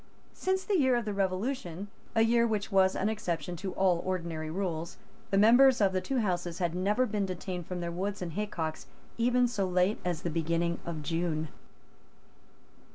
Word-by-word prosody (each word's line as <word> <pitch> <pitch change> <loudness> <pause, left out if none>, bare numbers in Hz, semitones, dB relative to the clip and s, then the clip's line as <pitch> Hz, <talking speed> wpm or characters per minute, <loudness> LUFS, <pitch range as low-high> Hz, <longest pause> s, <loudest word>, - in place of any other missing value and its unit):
Since 380 0 -1
the 400 -4 +1
year 260 -3 +4
of 240 -2 -1
the 210 - -2
Revolution, 195 -1 -2 0.3
a 225 - +5
year 235 +1 +4
which 215 -2 -2
was 190 -1 +4
an 200 - 0
exception 180 -6 -2
to 190 +2 -4
all 180 -3 +2
ordinary 170 -4 -3
rules, 170 -1 -3 0.3
the 195 - +1
members 245 +5 +6
of 195 -3 +3
the 185 - 0
two 270 +5 -2
Houses 175 -4 -1
had 175 -3 -1
never 205 +8 +1
been 210 -4 -1
detained 180 -1 -5
from 180 -1 -4
their 170 0 -3
woods 195 +4 -3
and 175 -3 -5
haycocks 170 -6 -3 0.3
even 245 +1 +3
so 205 -5 -1
late 180 +3 +2
as 175 -1 -2
the 170 - -1
beginning 170 +1 0
of 160 -3 -4
June. 160 0 -1
185 Hz, 180 wpm, -30 LUFS, 170-215 Hz, 0.3 s, members